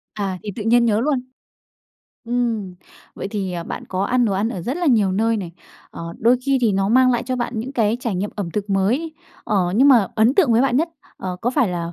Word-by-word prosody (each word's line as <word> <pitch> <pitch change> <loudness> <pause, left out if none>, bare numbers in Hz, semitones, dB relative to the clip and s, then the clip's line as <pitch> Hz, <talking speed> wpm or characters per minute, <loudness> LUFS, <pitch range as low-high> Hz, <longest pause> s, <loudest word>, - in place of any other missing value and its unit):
À, 195 -3 -3
thì 210 - -5
tự 215 - -4
nhiên 235 +2 +4
nhớ 220 -1 +2
luôn. 275 -1 +1 1.0
Ừm, 230 -6 -2 0.4
vậy 195 - -5
thì, 195 -4 -3
à, 170 -1 -4
bạn - - -6
có 190 +1 -1
ăn 245 +2 +2
đồ 205 - 0
ăn 200 +4 0
ở 185 -7 -5
rất 260 - -3
là 350 -2 -1
nhiều 210 -8 +3
nơi 225 +3 +1
này, 175 -4 -5 0.4
ờ, 170 0 -7
đôi 240 +3 +4
khi 275 -1 +3
thì 225 -4 +2
nó 195 +1 +1
mang 255 +2 +5
lại 240 - 0
cho 255 -1 -3
bạn 240 0 -3
những 255 +5 -5
cái 225 -2 +1
trải 230 -6 -2
nghiệm 200 +3 -2
ẩm 185 -5 -3
thực 205 +1 -4
mới. 245 +12 0 0.3
Ờ, 210 - 0 0.2
nhưng 275 +4 +6
mà 230 -8 +5
ấn 230 +5 +3
tượng 305 -12 +4
với 230 - +4
bạn 255 -2 +2
nhất, 330 +3 +1 0.3
ờ, 180 -1 -5
có 245 - 0
phải 245 -5 +2
là 170 -1 -4
225 Hz, 245 wpm, -21 LUFS, 195-250 Hz, 1.0 s, nhưng